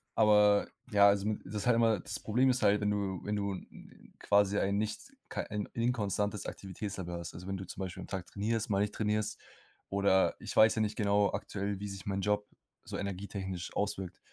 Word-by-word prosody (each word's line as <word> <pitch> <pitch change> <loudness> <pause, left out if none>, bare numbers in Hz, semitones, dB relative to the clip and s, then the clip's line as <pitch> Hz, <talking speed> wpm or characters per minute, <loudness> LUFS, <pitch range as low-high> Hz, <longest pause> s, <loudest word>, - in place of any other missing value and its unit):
aber 105 -1 +5 0.2
ja, 100 0 +7
also 100 0 +1
m 105 - -2
das 105 +5 -4
halt 120 - +5
immer 115 -4 +3
das - - -4
Problem 125 +5 +2
ist 125 -2 +1
halt, 105 0 +4
wenn 105 - +1
du 100 -3 -1
wenn 105 0 -1
du 100 -1 -1
n 95 - -12
quasi 100 0 +3
ein 100 0 +1
nicht 110 - -4 0.2
kei - - -2
ein 105 0 -2
inkonstantes 105 -4 -1
Aktivitätslevel 95 -2 -5
hast, 85 - -7
also 90 - -8
wenn 95 0 -2
du 95 - -7
zum 95 - -7
Beispiel 95 -1 -5
am - - -8
Tag 95 -2 -4
trainierst, 110 +3 -2
mal 100 - +2
nicht 105 - -1
trainierst 105 -1 -1 0.5
oder 100 -1 +3
ich - - -6
weiß 110 0 +7
ja 110 - +1
nicht 105 0 0
genau 100 -1 +3
aktuell, 100 -1 -3
wie 105 - -4
sich 100 -1 -8
mein 100 0 -1
Job 105 +1 0 0.4
so - - -5
energietechnisch 95 -2 -5
auswirkt. 95 -3 -2
100 Hz, 205 wpm, -32 LUFS, 95-105 Hz, 0.5 s, ja